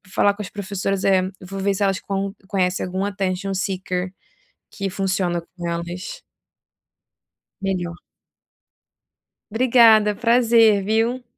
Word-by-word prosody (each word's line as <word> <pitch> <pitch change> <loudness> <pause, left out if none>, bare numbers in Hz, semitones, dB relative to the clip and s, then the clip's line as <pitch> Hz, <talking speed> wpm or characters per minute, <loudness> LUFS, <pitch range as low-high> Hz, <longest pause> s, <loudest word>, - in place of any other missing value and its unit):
falar 205 - +4
com 210 - -8
as 200 - -6
professoras 195 -1 -3
é 190 -1 +4 0.2
eu 185 - -10
vou 195 0 -6
ver 200 +1 +1
se 200 - -1
elas 195 -1 +1
con 195 0 -3 0.2
conhecem 185 -2 0
algum 185 +2 -3
attention 195 -1 -2
seeker 185 -1 -3 0.6
que 195 -2 -3
funciona 185 -2 -1
com 175 -2 -4
elas 175 - -5 1.4
melhor. 175 -3 -2 1.5
Obrigada, 225 -2 +5
prazer, 230 -3 +4
viu. 225 +4 0
195 Hz, 120 wpm, -22 LUFS, 185-210 Hz, 1.5 s, Obrigada